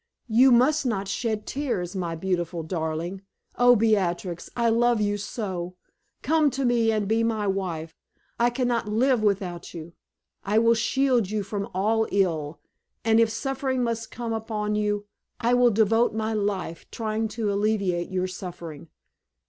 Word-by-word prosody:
You 250 Hz, +4 st, +6 dB
must 275 Hz, +6 st, +4 dB
not 205 Hz, -6 st, -1 dB
shed 215 Hz, +1 st, -2 dB
tears, 220 Hz, -11 st, -3 dB
my 170 Hz, -3 st, -2 dB
beautiful 175 Hz, -1 st, -2 dB
darling! 165 Hz, +2 st, -3 dB, 0.3 s
Oh, 245 Hz, 0 st, +6 dB
Beatrix, 190 Hz, -6 st, 0 dB
I 235 Hz, -1 st, +1 dB
love 235 Hz, 0 st, +3 dB
you 205 Hz, -1 st, +1 dB
so! 190 Hz, -4 st, -4 dB, 0.5 s
Come 310 Hz, -1 st, +3 dB
to 275 Hz, -, 0 dB
me, 235 Hz, -2 st, +3 dB
and 215 Hz, -2 st, 0 dB
be 225 Hz, +2 st, +2 dB
my 220 Hz, -2 st, 0 dB
wife. 180 Hz, -5 st, -3 dB, 0.4 s
I 240 Hz, +1 st, +4 dB
can 245 Hz, +1 st, -1 dB
not 235 Hz, -3 st, 0 dB
live 240 Hz, +3 st, +2 dB
without 190 Hz, -5 st, -1 dB
you! 165 Hz, 0 st, -8 dB, 0.5 s
I 205 Hz, +2 st, +1 dB
will 230 Hz, +1 st, +5 dB
shield 245 Hz, -2 st, +1 dB
you 210 Hz, -1 st, -1 dB
from 200 Hz, +2 st, -4 dB
all 220 Hz, +3 st, +2 dB
ill, 165 Hz, -6 st, 0 dB, 0.5 s
and 225 Hz, 0 st, +4 dB
if 230 Hz, -1 st, +4 dB
suffering 265 Hz, +1 st, -2 dB
must 230 Hz, -1 st, -2 dB
come 235 Hz, -1 st, -4 dB
upon 215 Hz, -1 st, -2 dB
you, 210 Hz, -1 st, 0 dB, 0.3 s
I 235 Hz, +1 st, +2 dB
will 245 Hz, 0 st, +5 dB
devote 225 Hz, +1 st, +2 dB
my 220 Hz, 0 st, -1 dB
life 200 Hz, -5 st, -3 dB
trying 220 Hz, 0 st, -2 dB
to 210 Hz, -3 st, 0 dB
alleviate 200 Hz, -4 st, 0 dB
your 185 Hz, -1 st, -1 dB
suffering. 175 Hz, -4 st, -8 dB
215 Hz, 155 wpm, -25 LUFS, 185-230 Hz, 0.5 s, You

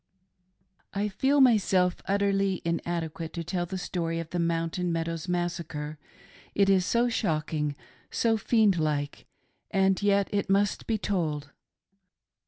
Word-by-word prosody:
I 205 Hz, +1 st, 0 dB
FEEL 270 Hz, +8 st, +2 dB
myself 190 Hz, -7 st, +4 dB
utterly 195 Hz, -1 st, +1 dB
inadequate 170 Hz, -1 st, -3 dB
to 170 Hz, -, -4 dB
tell 175 Hz, +1 st, -2 dB
the 190 Hz, -, -4 dB
story 165 Hz, -2 st, -2 dB
of 165 Hz, -1 st, -6 dB
the 175 Hz, -, -1 dB
Mountain 170 Hz, +1 st, 0 dB
Meadows' 165 Hz, 0 st, -2 dB
Massacre— 165 Hz, -4 st, -3 dB, 0.6 s
it 200 Hz, -1 st, +4 dB
is 185 Hz, -1 st, +3 dB
so 240 Hz, +1 st, +3 dB
shocking, 155 Hz, -8 st, -1 dB, 0.3 s
so 225 Hz, -1 st, +2 dB
fiqnd 215 Hz, -4 st, +3 dB
like. 145 Hz, -2 st, -2 dB, 0.4 s
And 195 Hz, -1 st, +2 dB
yet 200 Hz, -1 st, +3 dB
it 200 Hz, -1 st, -1 dB
must 200 Hz, +1 st, +1 dB
be 225 Hz, -, +1 dB
told. 155 Hz, -8 st, -2 dB
180 Hz, 130 wpm, -28 LUFS, 165-200 Hz, 0.6 s, myself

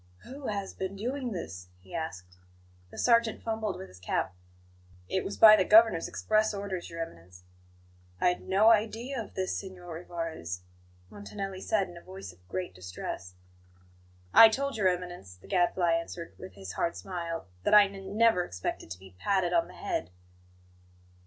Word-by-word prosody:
"Who 270 Hz, +1 st, -8 dB
has 200 Hz, -2 st, -3 dB
been 190 Hz, +1 st, -4 dB
doing 250 Hz, +4 st, -3 dB
this?" 90 Hz, -, -6 dB
he 90 Hz, -, -16 dB
asked. 95 Hz, -, -6 dB, 0.5 s
The -, -, -13 dB
sergeant 230 Hz, -2 st, +3 dB
fumbled 220 Hz, -3 st, -2 dB
with 95 Hz, -, -8 dB
his 90 Hz, 0 st, -15 dB
cap. 90 Hz, 0 st, -1 dB, 0.7 s
"It 190 Hz, -, -1 dB
was 200 Hz, -, -5 dB
by 215 Hz, -1 st, +10 dB
the 190 Hz, -, +3 dB
Governor's 215 Hz, -4 st, +6 dB
express 215 Hz, 0 st, +1 dB
orders, 195 Hz, -3 st, -4 dB
Your 165 Hz, 0 st, -5 dB
Eminence." 90 Hz, -, -13 dB, 0.8 s
"I -, -, +4 dB
had 180 Hz, -, -2 dB
no 205 Hz, +4 st, +5 dB
idea 230 Hz, +4 st, 0 dB
of 215 Hz, -, -11 dB
this, 185 Hz, 0 st, -1 dB
Signor 180 Hz, -3 st, -7 dB
Rivarez," 165 Hz, -, -5 dB, 0.5 s
Montanelli 195 Hz, -2 st, -6 dB
said 200 Hz, -2 st, +1 dB
in 175 Hz, -, -11 dB
a -, -, -10 dB
voice 185 Hz, -, -9 dB
of 90 Hz, +1 st, -26 dB
great 95 Hz, +1 st, -4 dB
distress. 90 Hz, 0 st, -7 dB, 1.0 s
"I 225 Hz, -, +11 dB
told 275 Hz, +5 st, -2 dB
Your 205 Hz, -4 st, +2 dB
Eminence," 175 Hz, -, -3 dB
the 90 Hz, -, -19 dB
Gadfly 175 Hz, -1 st, +2 dB
answered, 170 Hz, -, -4 dB
with 95 Hz, -, -9 dB
his 95 Hz, -2 st, -7 dB
hard 170 Hz, -, -1 dB
smile, 170 Hz, -3 st, -5 dB, 0.2 s
"that 150 Hz, -, +4 dB
I 210 Hz, -, +10 dB
n 200 Hz, -, -7 dB
n 195 Hz, +1 st, -7 dB
never 225 Hz, -6 st, +5 dB
expected 90 Hz, -, -5 dB
to 90 Hz, +1 st, -7 dB
be 95 Hz, -1 st, -14 dB
patted 190 Hz, -3 st, +1 dB
on 170 Hz, -1 st, +3 dB
the 180 Hz, -, -13 dB
head." 85 Hz, -, -3 dB
180 Hz, 170 wpm, -29 LUFS, -, 1.0 s, I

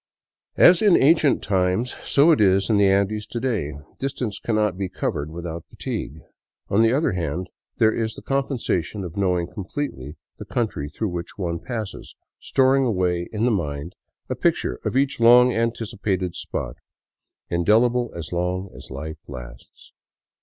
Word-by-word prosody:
As 175 Hz, -1 st, +7 dB
in 205 Hz, -4 st, +6 dB
ancient 155 Hz, 0 st, +4 dB
times, 95 Hz, +5 st, 0 dB
so 145 Hz, +4 st, +4 dB
it 150 Hz, -, +3 dB
is 95 Hz, 0 st, +3 dB
in 105 Hz, -, +4 dB
the 100 Hz, -1 st, +5 dB
Andes 100 Hz, +2 st, +1 dB
to 120 Hz, -, -4 dB
day; 110 Hz, -, -1 dB, 0.3 s
distance 130 Hz, -6 st, -3 dB
cannot 110 Hz, -4 st, 0 dB
be 95 Hz, 0 st, -3 dB
covered 75 Hz, -5 st, -3 dB
without 85 Hz, 0 st, -6 dB
fatigue. 75 Hz, +4 st, -5 dB, 0.5 s
On 100 Hz, -, +3 dB
the 115 Hz, 0 st, +4 dB
other 145 Hz, +1 st, +2 dB
hand 90 Hz, 0 st, -3 dB, 0.3 s
there 110 Hz, -1 st, +4 dB
is 110 Hz, -1 st, -2 dB
the -, -, -11 dB
com 135 Hz, 0 st, +1 dB
pensation 100 Hz, -, -2 dB
of 85 Hz, -, -8 dB
knowing 90 Hz, -3 st, +1 dB
completely 90 Hz, -, -5 dB, 0.2 s
the -, -, -7 dB
country 95 Hz, -12 st, -2 dB
through 105 Hz, +8 st, -3 dB
which 85 Hz, -1 st, -6 dB
one 85 Hz, -4 st, -2 dB
passes, 110 Hz, 0 st, -6 dB, 0.2 s
storing 135 Hz, 0 st, +3 dB
away 90 Hz, -7 st, 0 dB
in 110 Hz, +1 st, 0 dB
the 125 Hz, -, +3 dB
mind 75 Hz, -3 st, -3 dB, 0.3 s
a -, -, -2 dB
picture 60 Hz, -, 0 dB
of -, -, -1 dB
each 135 Hz, -2 st, +1 dB
long 125 Hz, +2 st, +7 dB
anticipated 105 Hz, -5 st, -1 dB
spot, -, -, -4 dB, 0.7 s
indelible 115 Hz, +7 st, +2 dB
as 85 Hz, 0 st, -6 dB
long 90 Hz, +2 st, -2 dB
as -, -, -10 dB
life 80 Hz, +4 st, -6 dB
lasts. 60 Hz, -1 st, -11 dB
100 Hz, 160 wpm, -23 LUFS, 85-120 Hz, 0.7 s, As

